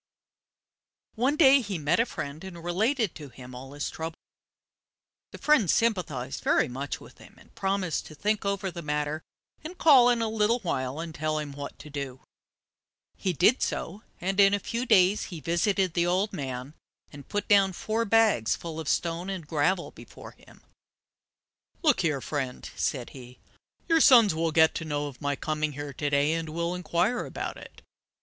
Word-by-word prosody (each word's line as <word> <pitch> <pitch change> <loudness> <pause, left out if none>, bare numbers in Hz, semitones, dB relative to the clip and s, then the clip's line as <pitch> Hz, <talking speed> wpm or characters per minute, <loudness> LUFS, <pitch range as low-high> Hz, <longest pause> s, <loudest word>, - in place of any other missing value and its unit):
One 255 +6 +1
day 275 -3 +6
he 200 -5 -4
met 155 +4 +1
a 230 - +3
friend 145 +4 -6
and 175 -3 -9
related 215 - 0
to 145 -3 -10
him 125 0 -12
all 130 +2 -9
his 145 0 -4
troubles. 160 0 -6 1.1
The - - -9
friend 280 - +3
sympathized 155 - 0
very - - +3
much 135 +3 -5
with - - -16
him, - - -16
and - - -20
promised 190 -4 -1
to 155 - -12
think 210 +6 0
over 200 -1 -2
the 170 0 -7
matter, 150 0 -2 0.4
and 345 +4 -8
call 270 -8 +7
in 235 -2 +2
a - - 0
little 220 +1 +2
while 130 -6 -2
and 165 -1 -5
tell 155 0 -2
him 150 -2 -4
what 140 0 -8
to 150 - -12
do. 140 -3 -6 0.9
He 190 - -1
did 210 - +3
so; 195 +6 -3 0.2
in 190 +2 -2
a 200 0 +6
few 235 +5 -4
days 195 -2 +4
he 170 - -8
visited 180 +3 0
the 170 0 +1
old 190 +4 0
man 130 -4 -5 0.4
and 140 -1 -12
put 205 0 -2
down 200 -2 +5
four 220 +5 -2
bags 220 - +3
full 165 -2 -7
of 160 - -4
stones 170 +2 -1
and 185 -5 -5
gravel 160 +5 0
before - - -12
him. - - -20 1.2
"Look 300 -5 +4
here, 150 -6 0
friend," 135 -3 -4
said 125 -4 -2
he. 125 -2 -12 0.5
"Your 330 -1 +4
sons 235 - +7
will 165 +1 0
get 160 0 +5
to - - -4
know 145 -2 -2
of 140 -3 -9
my 145 -1 -1
coming 155 0 -2
here 145 0 -6
to 145 +3 -2
day, 145 +2 +2
and 165 -1 -3
will 170 +2 -2
inquire 180 +7 0
about - - -5
it. - - -13
170 Hz, 180 wpm, -27 LUFS, 145-205 Hz, 1.2 s, call